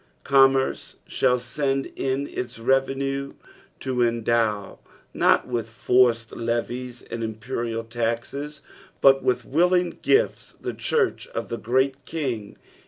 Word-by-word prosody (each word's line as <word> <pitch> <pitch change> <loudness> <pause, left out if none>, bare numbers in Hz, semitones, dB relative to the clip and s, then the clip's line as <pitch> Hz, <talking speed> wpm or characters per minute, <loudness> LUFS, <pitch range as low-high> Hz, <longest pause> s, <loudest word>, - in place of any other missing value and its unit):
Commerce 135 -1 +3
shall 125 -1 +2
send 135 +2 -1
in 135 +1 -1
its 125 -1 -5
revenue 135 +3 0 0.5
to 130 -2 -1
endow, 115 -3 +1 0.3
not - - +3
with 120 -3 -2
forced 115 -1 +2
levies 120 +1 -3
and 115 - -4
imporinl 115 +1 -3
luxes, 120 +6 -3 0.4
but 135 0 +6
with 125 - 0
willing 180 +3 +2
gifts 445 +5 +1
the - - -4
church 460 0 0
of - - -3
the 115 - -3
Great 130 +3 +1
King. 125 -11 -4
125 Hz, 115 wpm, -24 LUFS, 115-135 Hz, 0.5 s, but